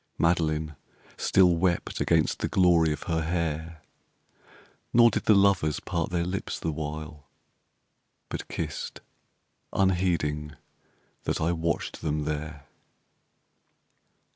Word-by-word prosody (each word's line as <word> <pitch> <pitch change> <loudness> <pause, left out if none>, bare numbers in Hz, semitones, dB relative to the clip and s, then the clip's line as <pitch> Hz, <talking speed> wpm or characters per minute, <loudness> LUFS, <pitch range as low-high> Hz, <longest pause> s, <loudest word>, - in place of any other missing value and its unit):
Madeleine 80 -2 +1 0.4
Still 90 -2 +4
wept 85 0 0
against 80 -2 +2
the - - 0
glory 85 -4 +4
of 75 - -4
her 80 -2 -1
hair, 80 -1 -3 1.1
Nor 120 0 +7
did - - -2
the 110 - +6
lovers 95 -6 +3
part 85 -2 -2
their 85 -1 -1
lips 95 +2 -3
the 80 - -2
while, 75 -1 -6 1.0
But - - -6
kissed - - -5 0.7
unheeding 85 -6 0 0.7
that - - -1
I 80 +2 +1
watched 85 0 -2
them 75 -1 -1
there. 75 -1 -4
80 Hz, 110 wpm, -27 LUFS, 75-90 Hz, 1.1 s, Nor